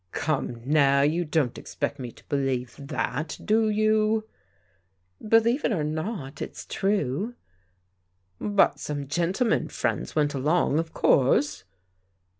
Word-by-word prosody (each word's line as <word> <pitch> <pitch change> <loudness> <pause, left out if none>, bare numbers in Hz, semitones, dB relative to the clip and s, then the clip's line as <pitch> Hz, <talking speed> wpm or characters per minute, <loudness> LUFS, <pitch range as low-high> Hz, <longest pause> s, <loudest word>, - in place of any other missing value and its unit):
Come 135 -6 -2
now, 140 -1 +4
you 160 +4 +2
don't 150 -6 0
expect 145 - -4
me 125 -2 -5
to - - -19
believe 135 -3 -1
that, 145 +2 -3
do 220 +1 +3
it - - +1
?»* - - -2
you 215 0 +2 0.5
" 90 - -18
Believe 230 +5 +4
it - - +1
or 170 -8 0
not, 155 -2 -4
it's - - -6
true." 195 - -1 1.0
But 205 -1 +2
some 145 -2 -4
gentlemen 180 - +1
friends - - -2
went 150 -1 +2
along, 150 +2 +2
of 165 0 -3
course? 135 0 +2
155 Hz, 135 wpm, -26 LUFS, 135-210 Hz, 1.0 s, now